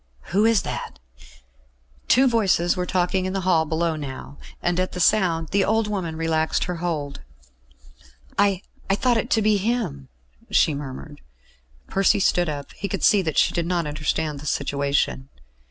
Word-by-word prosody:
"Who 205 +3 +4
is 225 -4 +3
that?" - - -5 1.1
Two 265 +2 +5
voices 195 -7 +2
were 180 0 -2
talking 185 +1 0
in 185 - -3
the 195 - -1
hall 170 -3 +2
below 160 +1 0
now, 140 -1 -8 0.2
and 175 +1 0
at 185 - -1
the 180 - -5
sound 170 -4 +2
the 200 0 +2
old 220 +2 +1
woman 185 -6 -3
relaxed 160 -1 0
her 180 -1 -3
hold. 155 -5 -3 1.1
"I 200 -2 +2 0.3
I 195 - +3
thought 245 +2 +2
it 235 +2 -2
to 220 - +2
be 215 -1 +3
him," 200 - -2 0.4
she 155 - +3
murmured. 145 +1 -8 0.7
Percy 195 +1 +2
stood 175 -3 +2
up; 145 -2 -6
he 200 - -4
could - - -3
see 205 - +5
that 160 -5 -3
she - - +4
did 170 -1 -1
not 175 -2 0
understand 150 0 -2
the 150 - -8
situation. 140 -1 -1
175 Hz, 170 wpm, -23 LUFS, 155-200 Hz, 1.1 s, Two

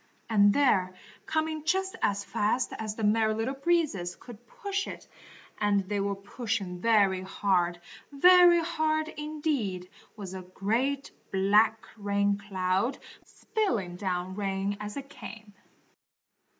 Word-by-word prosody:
And 205 -2 +6
there, 190 -9 +2 0.3
coming 315 -1 -1
just 380 +4 0
as 200 0 +1
fast 220 +5 0
as 215 -1 -4
the 220 - -5
Merry 220 +1 +3
Little 225 +4 -1
Breezes 275 - 0
could 240 -1 -13
push 405 -5 -3
it, - - -8 0.5
and 205 -1 +2
they 200 +2 -3
were 200 0 -1
pushing 200 -3 -4
very 200 -5 +3
hard, 185 -2 0 0.3
very 350 +3 +7
hard 315 -2 0
indeed, 295 - -3 0.3
was 195 -3 -7
a 190 - -6
great, 230 +10 -1 0.2
black, 210 +3 +3
rain 200 -1 +1
cloud, 195 +4 -1 0.3
spilling 230 - -2
down 180 -1 -3
rain 195 0 -2
as 210 +2 -6
it 275 -1 -6
came. 215 -6 -11
210 Hz, 125 wpm, -28 LUFS, 195-280 Hz, 0.5 s, very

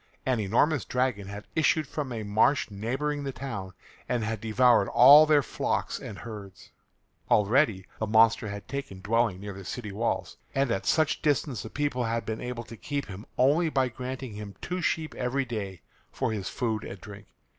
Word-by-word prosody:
An 130 -3 +1
enormous 120 +8 +2
dragon 125 -6 -1
had 100 +1 -8
issued 155 0 +3
from 140 -1 -4
a 115 -2 -4
marsh 110 +5 +2
neighbouring 135 +8 -2
the 135 - -3
town 115 -7 -6 0.4
and 120 -2 0
had 110 -1 -3
devoured 115 -1 +4
all 150 +3 +8
their 150 -2 +5
flocks - - -2
and 100 - -8
herds. 105 -4 -10 0.6
Already 105 -2 +3
the 110 - -1
monster 115 +1 +4
had 100 0 -7
taken 135 -9 -6
dwelling 110 -2 +1
near 100 0 -6
the 95 +1 -9
city 105 +2 -5
walls, 115 +4 -2 0.2
and 135 -2 +2
at 95 - -2
such 155 -2 +2
distance 145 -6 0
the 110 - -7
people 145 -3 -1
had 115 0 -1
been 110 0 -4
able 125 -1 -4
to 115 0 -11
keep 140 +5 -3
him 100 +2 -9
only 150 +6 +4
by 135 -4 +1
granting 130 -1 -6
him 105 -1 -8
two 180 +1 -3
sheep 160 -1 -1
every 130 +2 -1
day 100 -7 -5 0.3
for - - -1
his 105 -4 -3
food 110 -3 -2
and 95 - -8
drink. 105 0 -11
115 Hz, 185 wpm, -28 LUFS, 105-135 Hz, 0.6 s, all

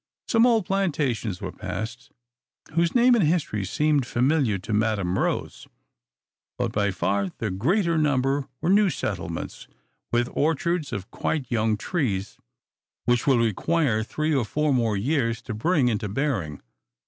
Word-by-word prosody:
Some 230 0 +4
few - - +5
old 225 -5 +2
plantations 140 - -1
were - - -4
passed, 110 +5 -6 0.6
whose 170 +4 +1
name 245 +1 +6
and 230 -5 +4
history 150 - 0
seemed 145 +6 +1
familiar 125 -4 +2
to 95 +4 -5
Madam 105 -4 +1
Rose; - - -2 0.9
but - - -1
by 100 -1 +1
far 100 +1 0
the 110 -3 -2
greater 170 - +1
number 135 -2 +1
were 175 - +1
new 205 0 +5
settlements, - - -4 0.4
with 120 0 +2
orchards 160 0 0
of 100 -4 -5
quite 140 -6 -2
young 110 -2 +1
trees, 105 - -2 0.7
which 120 +1 +1
will 135 -3 +5
require 115 - +1
three 155 +7 -1
or 135 -4 +2
four 150 +6 0
more 115 -5 +1
years 115 0 0
to 115 - -5
bring 140 +4 +2
into 105 -3 -1
bearing. 105 - -2
130 Hz, 150 wpm, -25 LUFS, 110-160 Hz, 0.9 s, name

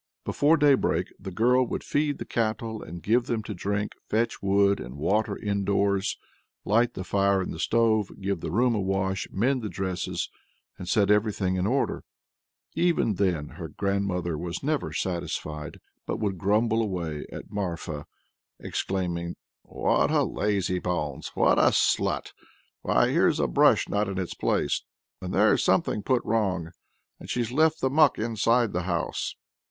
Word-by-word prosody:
Before 155 +3 +3
daybreak 145 -3 +2
the 95 - -6
girl 125 +7 +3
would - - -4
feed 145 -1 0
the - - -6
cattle 110 -1 -2
and 85 +1 -9
give 120 +3 +2
them 115 -2 -1
to 105 - -5
drink, 100 +3 -2 0.2
fetch 115 +2 0
wood 100 0 +3
and 60 +1 -8
water 105 +7 0
indoors, 100 -1 0 0.5
light 115 +3 +2
the 95 - -4
fire 100 0 +2
in 95 - -3
the 80 - -7
stove, 110 0 +2
give 100 -2 -2
the - - -4
room 120 +8 +2
a 105 - 0
wash, 95 0 -1
mend 125 +6 +1
the 110 - -4
dresses, 95 -2 -3 0.4
and 90 - -8
set 105 -1 +3
everything 105 -3 +1
in 90 +1 0
order. 135 +4 0 0.7
Even 170 -9 +2
then 90 -6 0
her - - -8
stepmother 95 -5 -1
was 85 +5 -5
never 150 +1 -1
satisfied, 80 -4 -4 0.3
but - - -2
would 95 -4 -2
grumble 110 +4 +2
away 85 -8 -3
at - - -9
Marfa, 85 -7 -4 0.5
exclaiming: 85 -3 -3 0.3
"What - - +1
a - - +3
lazybones! 90 -7 -1
what - - +4
a - - +6
slut! - - +1 0.5
Why - - +3
here's - - +3
a - - +2
brush - - +4
not 105 0 0
in 95 - -4
its 95 -2 -3
place, 70 - 0 0.4
and - - -5
there's - - +3
something 105 - +2
put 125 +3 0
wrong, 95 -7 0 0.5
and - - -11
she's 120 -2 -1
left 160 +4 +2
the 130 - +1
muck 150 -1 +5
inside 115 +1 +1
the 90 0 -2
house!" 85 -1 -2
100 Hz, 160 wpm, -26 LUFS, 90-115 Hz, 0.7 s, a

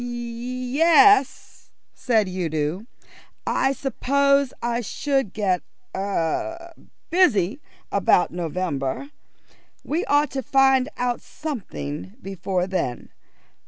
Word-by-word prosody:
"Ye 245 +3 -4
es," 335 0 +4 0.2
said 220 -5 +1
Udo. 170 +1 -2 0.6
"I 270 - +1
suppose 280 0 +1
I 240 0 -1
should 270 0 -1
get 195 -4 0 0.3
er 200 - -2 0.4
busy 280 - +3 0.3
about 195 -2 +3
November. 170 - -3 0.7
We 325 +5 -1
ought 290 -1 +2
to 270 - -2
find 270 +1 +3
out 245 -1 -1
something 195 - -6
before 190 -3 -2
then. 180 -10 -3
240 Hz, 90 wpm, -23 LUFS, 185-275 Hz, 0.7 s, es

